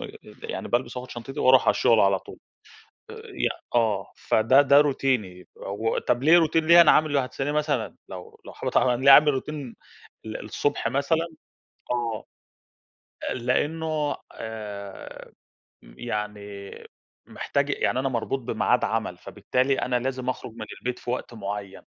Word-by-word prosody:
م - - -6 0.3
يعني - - -5
بالبس 125 +1 -1
وآخد 125 +1 -7
شنطتي 135 +5 -7
وأروح 130 0 +6
على - - +5
الشغل 115 -2 +3
على 100 -1 +3
طول - - -13 0.7
آآ، - - -8
ي - - -3 0.3
آه، 110 -5 +1
فده 130 +6 +4
ده 140 +1 +6
روتيني 130 -10 -1
وطَب 115 +4 -2
ليه 160 +4 +7
روتين 160 0 +2
ليه، 170 +1 +8
أنا 170 - +7
عامِله 145 -4 +3
هتسأليني 140 +3 -3
مثلًا 145 -9 -1
لو 90 -1 -10
لو - - -9
حابة - - -4
طبعًا، 125 -1 +3
ليه 135 +3 +4
عامل 150 +2 +9
روتين 140 -2 -6 0.5
ال 110 -1 -6
الصبح 110 +7 -1
مثلًا، 160 +4 0 0.7
آه، 115 -3 -2 1.1
لأنه 150 +4 -1 0.2
آآ، 105 -3 -8 0.5
م - - -17
يعني 105 -3 -5 0.6
محتاج 140 +1 -2
يعني 130 - 0
أنا 135 +1 0
مربوط 130 +2 -2
بميعاد 120 - +1
عمل، - - -2
فبالتالي 130 +2 -1
أنا 125 0 0
لازم 130 0 -3
أخرج 125 -2 -4
من 110 -1 -8
البيت 125 0 -3
في - - -6
وقت 125 -1 -4
معيّن، 100 -2 -6
125 Hz, 150 wpm, -25 LUFS, 110-140 Hz, 1.1 s, عامل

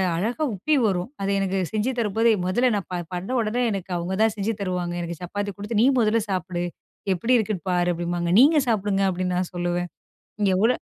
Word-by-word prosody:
அழகாக 235 - -1
உப்பி 300 +12 +1
வரும், 185 0 0
அதை 195 - -1
எனக்கு 195 0 0
செஞ்சு 220 +4 0
தரும்போது 225 +1 +2
மொதல்ல 240 +7 +2
நான் 200 - -3
ப - - 0 0.2
பண்ண 180 +3 -4
உடனே, 225 +3 -1
எனக்கு 190 -2 -4
அவுங்க 175 +2 -2
தான் 220 -1 +3
செஞ்சு 210 +2 -1
தருவாங்க. 180 -2 -2
எனக்கு 170 -1 -5
சப்பாத்தி 205 +3 -3
குடுத்து, 205 +2 -2
"நீ - - +5
முதல்ல 225 0 +3
சாப்பிடு. 180 -2 -2 0.5
எப்படி 230 +8 +2
இருக்குன்னு 210 -4 -2
பாரு!" 175 0 +2
அப்படிம்பாங்க. 175 0 -2
"நீங்க 300 +4 +6
சாப்பிடுங்க" 205 -3 +1
அப்படின்னு 180 0 -1
நான் 180 -1 -2
சொல்லுவேன். 175 0 -1 0.5
இங்க 200 - +3
எவ்வளோ 225 +6 +3
195 Hz, 185 wpm, -24 LUFS, 180-220 Hz, 0.5 s, நீங்க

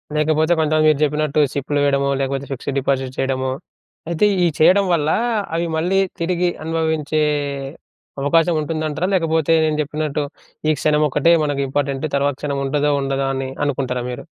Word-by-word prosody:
లేకపోతే 155 +2 +2
కొంతమంది 155 0 +2
మీరు 150 -1 +2
చెప్పినట్టు 150 0 0
సిప్‌లు 145 +1 -1
వేయడమో, 140 -1 +2
లేకపోతే 135 0 -2
ఫిక్స్డ్ 135 +1 -4
డిపాజిట్ 135 -1 -1
చేయడమో, 130 -1 -1 0.6
అయితే 170 +5 +2 0.2
ఈ - - +4
చేయడం 190 +5 +5
వల్ల 150 -2 +1 0.5
అవి 170 +1 0
మళ్ళీ 180 +4 +1 0.2
తిరిగి 175 +1 0
అనుభవించే 160 -1 -1 1.0
అవకాశం 165 +4 +3
ఉంటుందంటారా? 155 +2 -2
లేకపోతే 160 -2 +1
నేను 155 -1 0
చెప్పినట్టు 150 0 -2 0.5
ఈ - - +5
క్షణం 150 0 +2
ఒక్కటే 155 +5 +3
మనకు 145 -2 -1
ఇంపార్టెంట్, 140 +1 -1
తర్వాత 140 -1 +1
క్షణం 140 -2 -2
ఉంటదో 145 +1 +1
ఉండదో 135 0 -1
అని 130 0 -3 0.2
అనుకుంటారా 130 -3 -2
మీరు? 125 - -7
150 Hz, 145 wpm, -20 LUFS, 140-160 Hz, 1.0 s, చేయడం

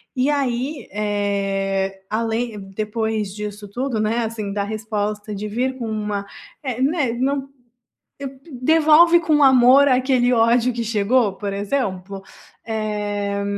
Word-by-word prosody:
e 260 +3 +1
aí, 270 0 -2
eh, 195 -2 -1
além 225 0 -2
depois 215 -1 -2
disso 210 0 -6
tudo 245 +1 -2
não 215 0 +1
é 230 0 0
assim, 220 -3 -4
da 200 0 -1
resposta 210 0 -3
de 210 +2 -4
vir 255 +5 -2
com 235 - -4
uma 210 -2 -3 0.4
é, 255 -2 -3
né, 275 -4 +1
não, 270 +2 -1 1.1
devolve 315 +5 +5
com 310 -3 +2
amor 265 +1 +6
aquele 255 -1 +2
ódio 235 +1 +3
que 235 0 -3
chegou 215 0 +2
por 200 -1 -4
exemplo, 195 -3 -3 0.4
eh, 205 -2 -2
220 Hz, 130 wpm, -21 LUFS, 205-255 Hz, 1.1 s, amor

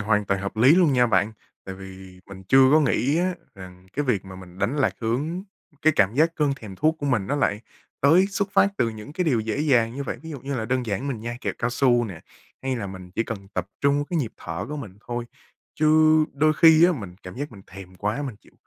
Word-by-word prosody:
hoàn 105 0 +1
toàn 100 -1 -1
hợp 100 +2 -5
lý 130 +8 +6
luôn 175 -5 +4
nha 125 -2 +4
bạn. 110 -1 +1 0.3
Tại 95 - -7
vì 95 -1 -12
mình 95 -1 -11
chưa 135 0 +6
có 155 - +6
nghĩ 140 +1 +1
á, 180 +1 0 0.2
rằng 95 -1 -12
cái 145 - -1
việc 110 -8 0
mà 95 -1 -10
mình 90 0 -13
đánh 135 - -1
lạc 145 - +2
hướng 140 +11 -2 0.4
cái 155 - +5
cảm 100 +3 +3
giác 160 +4 +2
cơn 150 -2 +2
thèm 105 -7 -10
thuốc 155 - +1
của 145 - -3
mình 115 -8 +1
nó 145 - -1
lại 105 -7 0 0.4
tới 165 +7 +5
xuất 200 0 -2
phát - - +5
từ 115 - +2
những 110 +5 -9
cái 180 +2 -1
điều 130 -8 +2
dễ 110 +5 -2
dàng 125 -6 +2
như 140 - -4
vậy. - - -5
Ví 160 - -8
dụ 145 -4 -7
như 140 +3 -4
là 110 - -2
đơn 125 +1 -1
giản 110 +7 -2
mình 120 -5 -4
nhai 120 +1 -5
kẹo - - -2
cao 120 - -1
su 120 -1 +3
nè, 95 -7 -8 0.4
hay 130 -1 -1
là 105 -4 -4
mình 95 -1 -9
chỉ 115 - -1
cần 100 -3 -7
tập 90 -1 -2
trung 140 +1 +2
cái 175 - 0
nhịp 120 -7 -2
thở 85 +3 -5
của 150 - -4
mình 105 -9 -9
thôi, 120 0 -3 0.5
chứ 155 - +1 0.5
đôi 155 +2 +3
khi 160 +1 +6
á, 180 - +5
mình 100 - -7
cảm 90 - -9
giác 145 -1 -5
mình 100 -3 -13
thèm 95 -1 -12
quá, 105 +9 -2
mình 125 -7 -5
chịu - - -23
120 Hz, 255 wpm, -24 LUFS, 100-145 Hz, 0.5 s, lý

